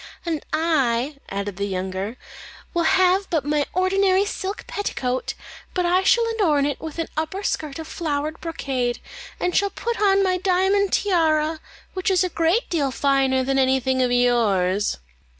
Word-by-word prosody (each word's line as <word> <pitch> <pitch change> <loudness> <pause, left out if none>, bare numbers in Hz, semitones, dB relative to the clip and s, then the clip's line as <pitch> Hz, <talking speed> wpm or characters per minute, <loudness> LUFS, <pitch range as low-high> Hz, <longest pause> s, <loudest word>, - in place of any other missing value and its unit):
"And 320 -3 -2
I," 285 -4 +1
added 200 -1 -4
the 200 - -1
younger, 190 +4 -4 0.6
"will 340 -1 +1
have 375 +1 +3
but 310 -5 0
my 295 -1 0
ordinary 380 +1 +2
silk 400 0 -4
petticoat, 255 -11 -3 0.4
but 360 -1 +1
I 360 +2 +3
shall 465 +4 +4
adorn 330 -11 +2
it 285 -2 -2
with 320 0 -7
an 330 - -2
upper 320 +6 -3
skirt 300 -7 -2
of 320 -1 -7
flowered 310 -1 -3
brocade, 265 -7 -2 0.4
and 360 - -1
shall 400 0 +3
put 470 +2 -4
on 395 -1 +4
my 370 -1 +1
diamond 380 +2 +2
tiara, 320 -5 +2 0.3
which 370 0 -1
is 375 -1 +3
a 365 - -1
great 335 +7 +1
deal 295 -6 0
finer 265 -1 +2
than 270 +1 +1
anything 260 0 +2
of 250 -1 +1
yours." 210 -6 +2
315 Hz, 160 wpm, -23 LUFS, 260-370 Hz, 0.6 s, shall